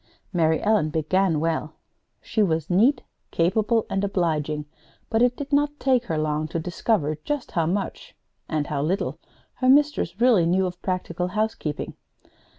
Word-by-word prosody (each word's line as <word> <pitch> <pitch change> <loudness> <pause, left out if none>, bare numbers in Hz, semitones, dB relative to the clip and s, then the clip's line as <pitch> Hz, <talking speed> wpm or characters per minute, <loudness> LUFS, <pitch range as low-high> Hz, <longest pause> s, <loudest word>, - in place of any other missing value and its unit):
Mary 160 -2 +2
Ellen 210 -7 +2
began 160 +2 +1
well. 160 -1 -2 0.5
She 220 - 0
was 165 -4 0
neat, 245 +9 +3 0.3
capable, 215 +6 +1
and 195 - -1
obliging; 155 -6 -1 0.5
but 225 - +2
it 245 0 +3
did 285 0 -6
not 290 +1 +2
take 255 -2 +2
her 160 - -2
long 155 0 -1
to 165 - -3
discover 170 -2 0
just 295 -3 -3
how 165 -2 0
much 195 +3 -3 0.3
and 155 -2 0
how 145 -1 -2
little 175 +7 -1 0.4
her 255 - +2
mistress 280 - +3
really 235 -9 +4
knew 185 +2 +2
of 180 -1 -5
practical 180 -1 -2
housekeeping. 205 -6 -2
180 Hz, 155 wpm, -24 LUFS, 160-225 Hz, 0.5 s, really